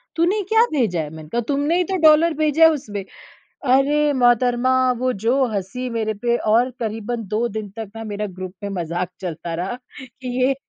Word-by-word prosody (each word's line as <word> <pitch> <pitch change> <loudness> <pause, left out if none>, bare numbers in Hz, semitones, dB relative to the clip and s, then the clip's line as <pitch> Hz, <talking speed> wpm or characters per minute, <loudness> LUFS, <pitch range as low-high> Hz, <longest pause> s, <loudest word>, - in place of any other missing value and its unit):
तूने 355 +5 +2
क्या 445 0 +5
भेजा 215 - +1
है?" 150 - -5
मैंने 155 0 -11
कहा 240 - -1
तुमने 290 +4 +1
ही 360 - +3
तो 380 - +1
डॉलर 315 +2 +5
भेजा 305 +1 +3
है 320 - +9
उसमें। 210 -9 -4 0.7
अरे 295 +2 +3
मोहतरमा 245 +1 +3 0.3
वो 255 0 +1
जो 265 +4 +3
हंसी 205 +6 -3
मेरे 220 -2 -1
पे 240 0 +2
और 235 +4 +2
करीबन 225 0 -4
2 220 +4 0
दिन 215 -2 -5
तक 215 -3 -6
ना 225 - -6
मेरा 210 +1 -2
ग्रुप 185 -1 -6
में 200 - -3
मजाक 170 +2 -3
चलता 170 -2 -5
रहा 185 +7 -3 0.3
कि 255 0 -11 0.2
ये 270 +1 +3
240 Hz, 190 wpm, -21 LUFS, 205-275 Hz, 0.7 s, है